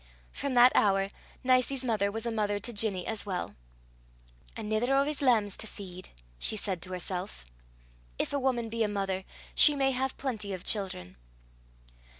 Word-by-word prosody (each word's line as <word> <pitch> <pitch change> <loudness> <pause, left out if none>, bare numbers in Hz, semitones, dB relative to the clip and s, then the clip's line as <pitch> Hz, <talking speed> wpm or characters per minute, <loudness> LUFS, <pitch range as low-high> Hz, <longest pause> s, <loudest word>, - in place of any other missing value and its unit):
From 275 -2 -3
that 245 +1 +8
hour 195 -1 +3 0.3
Nicie's 255 +1 +3
mother 210 -4 +1
was 225 +2 -4
a 235 - -1
mother 205 -2 0
to 240 +4 -3
Ginny 205 -4 +1
as 220 -2 -2
well. 185 -3 -3 1.0
"Anither 220 +4 0
o' 275 0 +4
's 300 -1 -2
lambs 220 -7 +3
to 220 - -4
feed!" 185 -3 -9 0.3
she - - +2
said 190 -4 -1
to 185 - -5
herself. 180 - -3 0.7
If - - -2
a 285 - +1
woman 255 -3 0
be 230 +1 -4
a 220 - +3
mother 195 -2 -2 0.3
she 295 - +7
may 270 -1 +2
have 265 +1 -2
plenty 215 -7 -3
of 185 -1 -6
children. 185 - -2
215 Hz, 165 wpm, -30 LUFS, 195-255 Hz, 1.0 s, that